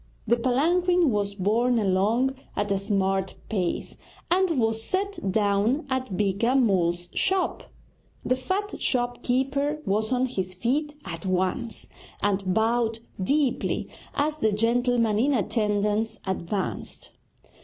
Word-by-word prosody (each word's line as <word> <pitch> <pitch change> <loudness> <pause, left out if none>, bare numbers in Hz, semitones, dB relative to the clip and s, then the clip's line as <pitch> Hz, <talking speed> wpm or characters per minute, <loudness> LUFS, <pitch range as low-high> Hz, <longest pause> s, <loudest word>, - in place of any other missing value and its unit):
The 235 - +4
palanquin 330 +7 +2
was 205 -1 -1
borne 230 +5 +2
along 215 +6 +2 0.2
at 205 0 -1
a 195 - +2
smart 195 -1 0
pace 185 -5 -2 0.3
and 355 -5 +3
was 225 -1 +1
set 380 - -2
down 210 +7 +2
at 255 -8 -2
Beeka 210 +5 +1
Mull's 175 -8 +2
shop. 380 -1 0 0.6
The 255 - +2
fat 380 +10 -3
shop 245 -1 0
keeper 275 +4 0
was 215 +3 0
on 255 0 +2
his 190 -7 -3
feet 290 +9 -1
at 165 -3 -6
once, 185 +5 -1 0.3
and 195 -2 0
bowed 225 +2 +1 0.2
deeply 270 +5 0 0.3
as 300 +1 0
the 220 -7 +2
gentleman 230 0 +2
in 275 +4 +3
attendance 210 -1 0
advanced. 190 +1 -3
225 Hz, 125 wpm, -26 LUFS, 200-260 Hz, 0.6 s, The